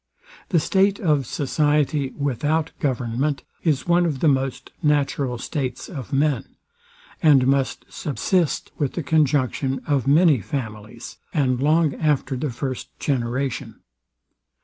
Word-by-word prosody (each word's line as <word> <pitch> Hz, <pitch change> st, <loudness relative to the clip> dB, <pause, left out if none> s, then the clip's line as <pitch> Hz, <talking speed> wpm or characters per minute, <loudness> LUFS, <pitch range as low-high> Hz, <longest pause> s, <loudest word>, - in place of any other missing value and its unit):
The 175 Hz, -, +3 dB
state 195 Hz, +5 st, +2 dB
of 150 Hz, -, +1 dB
society 145 Hz, 0 st, +1 dB
without 145 Hz, +3 st, 0 dB
government 130 Hz, +2 st, -1 dB, 0.2 s
is 150 Hz, -6 st, +1 dB
one 175 Hz, 0 st, +4 dB
of 145 Hz, -5 st, -2 dB
the 160 Hz, -, +2 dB
most 135 Hz, -2 st, 0 dB
natural 140 Hz, -4 st, +1 dB
states 130 Hz, 0 st, -4 dB
of 135 Hz, -, -7 dB
men, 140 Hz, 0 st, 0 dB, 0.7 s
and 145 Hz, -6 st, +5 dB
must 135 Hz, 0 st, 0 dB
submit 165 Hz, +3 st, -1 dB
with 145 Hz, -4 st, 0 dB
the 170 Hz, -, -3 dB
conjunction 140 Hz, -3 st, +1 dB
of 140 Hz, -4 st, 0 dB
many 150 Hz, -1 st, +5 dB
families, 110 Hz, -3 st, -6 dB, 0.2 s
and 130 Hz, -4 st, +1 dB
long 155 Hz, 0 st, +3 dB
after 145 Hz, -4 st, 0 dB
the 140 Hz, +3 st, -2 dB
first 130 Hz, +1 st, -5 dB
generation. 125 Hz, -2 st, -2 dB
140 Hz, 125 wpm, -23 LUFS, 130-150 Hz, 0.7 s, and